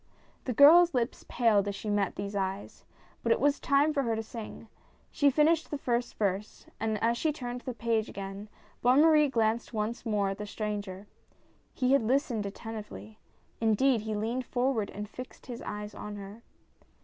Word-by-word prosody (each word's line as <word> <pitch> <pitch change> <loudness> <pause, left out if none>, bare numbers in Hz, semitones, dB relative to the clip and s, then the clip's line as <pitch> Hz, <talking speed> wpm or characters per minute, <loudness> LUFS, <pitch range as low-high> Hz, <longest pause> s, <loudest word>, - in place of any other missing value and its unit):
The 255 - -1
girl's 325 +6 +7
lips 240 -1 -1
paled 215 -5 +3
as 200 - -2
she 205 - -7
met 205 -2 0
these 200 0 -5
eyes, 195 0 -4 0.4
but 230 - 0
it - - +3
was 285 +2 +2
time 285 +2 +3
for 280 - +1
her 230 -4 0
to 220 - -3
sing. 225 0 -9 0.4
She 285 -2 +3
finished 310 +4 +2
the 295 - -3
first 240 -2 -1
verse, 200 0 -2
and 220 -1 -1
as 235 +1 +2
she 315 - +1
turned 245 -4 -6
the 250 -1 -6
page 225 -1 0
again, 195 +1 -7 0.3
Bonne 250 +4 +5
Marie 305 -2 +5
glanced 230 -1 0
once 215 +2 -2
more 210 -4 0
at 195 +1 -5
the 210 - -5
stranger. 205 -2 -4 0.7
He 255 0 +2
had 275 - +5
listened 235 -3 0
attentively 200 - -8 0.2
— - - -38
indeed, 225 +2 +3
he 215 0 -3
leaned 235 +4 -2
forward 245 -4 0
and 210 +1 -6
fixed 255 +4 -10
his 240 -2 -7
eyes 210 0 -6
on 210 0 -7
her. 200 +2 -9
225 Hz, 185 wpm, -29 LUFS, 210-255 Hz, 0.7 s, girl's